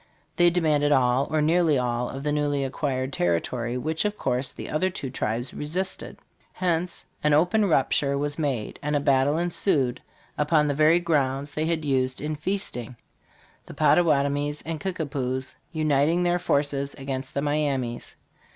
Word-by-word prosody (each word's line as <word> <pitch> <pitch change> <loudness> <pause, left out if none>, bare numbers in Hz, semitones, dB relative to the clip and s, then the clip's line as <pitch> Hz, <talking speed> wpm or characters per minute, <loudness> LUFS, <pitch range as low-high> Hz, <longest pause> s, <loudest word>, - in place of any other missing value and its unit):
They 175 0 +5
demanded 155 -4 +2
all 130 0 +3
or 155 -1 +1
nearly 160 -2 +3
all 125 -1 -1
of 135 +1 -6
the 150 - 0
newly 145 -1 0
acquired 135 -1 -2
territory, 115 +8 -1
which, 155 +5 -1
of 210 0 -2
course, 125 +2 -1
the - - -8
other 170 +5 0
two 140 -7 -6
tribes 120 0 -3
resisted; 180 +6 -3 0.4
hence 175 -1 -2 0.2
an 150 0 +3
open 180 +8 +3
rupture 140 -4 +2
was 145 +2 -2
made, 135 -8 -2
and 150 +1 -1
a - - +3
battle 140 +1 +2
ensued 170 -6 0 0.4
upon 150 0 +3
the 145 - +1
very 155 +4 +4
grounds 145 -4 0
they 155 +1 -1
had 160 -2 -1
used 130 -2 0
in 155 +1 -3
feasting, 150 - -3 0.7
the - - -10
Pottawatomies 145 -3 +2
and 160 -1 -3
Kickapoos 135 -8 -3 0.2
uniting 155 +2 +2
their 175 0 +2
forces 140 -4 0
against 135 -1 -5
the 140 - 0
Miamis. 140 -5 -2
145 Hz, 155 wpm, -25 LUFS, 135-160 Hz, 0.7 s, They